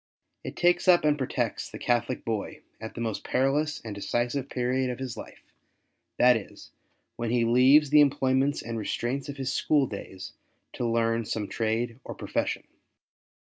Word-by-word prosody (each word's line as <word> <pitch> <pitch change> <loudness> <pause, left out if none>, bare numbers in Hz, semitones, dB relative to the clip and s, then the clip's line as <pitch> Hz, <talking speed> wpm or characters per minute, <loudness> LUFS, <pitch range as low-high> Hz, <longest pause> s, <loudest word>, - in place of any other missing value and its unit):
It - - -6
takes 175 0 +2
up 175 -3 +6
and 150 -1 +4
protects 135 -3 -2
the - - -8
Catholic 120 +1 -1
boy 110 -3 -3 0.2
at 110 0 -8
the 120 - -5
most 110 -3 -3
perilous 145 +4 0
and 110 - -5
decisive 120 +6 -2
period 130 +1 0
of 125 - -4
his 130 -3 -5
life - - -12 0.3
— - - -50
that 125 0 +6
is, 110 -3 -8 0.5
when 115 -1 -2
he 120 0 +2
leaves 130 +5 +5
the 150 0 +7
employments 135 0 +2
and 115 -1 -4
restraints 125 +6 -3
of 140 - -6
his 135 -1 -2
school 145 -3 +2
days 95 -4 -8 0.4
to 120 - -2
learn 115 0 +1
some 105 -1 -3
trade 115 +2 -2
or - - -7
profession. - - -2
125 Hz, 170 wpm, -27 LUFS, 115-140 Hz, 0.5 s, the